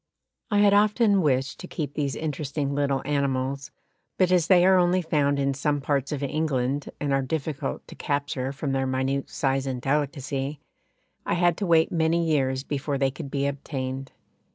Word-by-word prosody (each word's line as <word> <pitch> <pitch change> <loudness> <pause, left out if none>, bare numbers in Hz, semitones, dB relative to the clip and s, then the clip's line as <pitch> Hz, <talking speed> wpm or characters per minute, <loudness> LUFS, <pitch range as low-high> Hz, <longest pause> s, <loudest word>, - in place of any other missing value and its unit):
I 205 - +1
had 205 -1 +5
often 210 0 +4
wished 135 -4 0
to 180 - -8
keep 150 -6 -4
these 140 -3 -1
interesting 145 -2 -3
little 140 -2 0
animals, 140 -1 -1 0.5
but 185 -1 +3
as 175 -3 +3
they 180 -2 +6
are 190 0 +6
only 180 +1 +2
found 145 -3 +1
in 140 0 +1
some 145 +1 0
parts 140 0 -1
of 145 -1 -3
England 140 -2 -1
and 145 -1 -1
are 135 - +2
difficult 140 - -3
to - - -10
capture 140 -2 -2
from 140 0 -3
their 135 0 0
minute 130 +1 -1
size 135 -1 -1
and 130 -2 -2
delicacy, 140 0 -2 0.6
I - - 0
had 175 -1 +3
to 200 - -2
wait 165 -1 +4
many 165 0 +2
years 135 -4 +1
before 145 0 -2
they 135 0 +1
could 135 - -7
be 140 0 -1
obtained. 135 -1 -4
140 Hz, 175 wpm, -25 LUFS, 135-160 Hz, 0.6 s, they